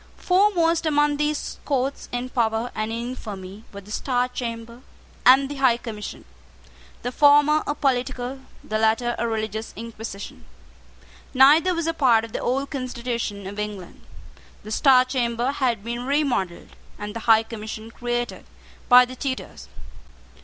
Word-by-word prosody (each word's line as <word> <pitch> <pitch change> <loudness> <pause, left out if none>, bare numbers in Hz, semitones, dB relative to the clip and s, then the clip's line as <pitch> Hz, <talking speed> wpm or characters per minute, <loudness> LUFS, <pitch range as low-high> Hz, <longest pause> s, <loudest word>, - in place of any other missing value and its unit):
Foremost 350 -4 +2
among 295 -1 +2
these 300 0 -2
courts 275 -1 -2
in 245 +1 -3
power 230 -1 0
and 215 +1 -3
in 235 +2 -3
infamy 205 -4 -8
were 200 - -9
the 205 +2 -14
Star 250 +2 0
Chamber 235 -1 -6 0.5
and 265 +2 +7
the 285 0 -7
High 260 -3 +4
Commission, 220 -3 -8 0.8
the 245 - -2
former 295 +2 +5
a 295 - -1
political, 260 -1 -1 0.2
the 215 0 -2
latter 225 +2 +2
a 235 - 0
religious 220 -1 -3
inquisition. 225 -2 -8 0.9
Neither 305 +7 +6
was 335 -1 -2
a 330 - 0
part 240 -7 +3
of 225 - -12
the - - -3
old 275 +3 -1
constitution 240 -6 -4
of 200 +2 -6
England. 205 -4 -6 0.6
The 215 - -9
Star 255 +1 +5
Chamber 245 -1 -1
had 245 -7 -1
been 240 +2 -4
remodelled, 270 - -1 0.3
and 210 0 -6
the - - -3
High 220 0 +7
Commission 220 0 -8
created, 240 0 -3 0.4
by 250 0 +9
the 255 +1 -9
Tudors. 260 0 -5
245 Hz, 145 wpm, -23 LUFS, 220-275 Hz, 0.9 s, by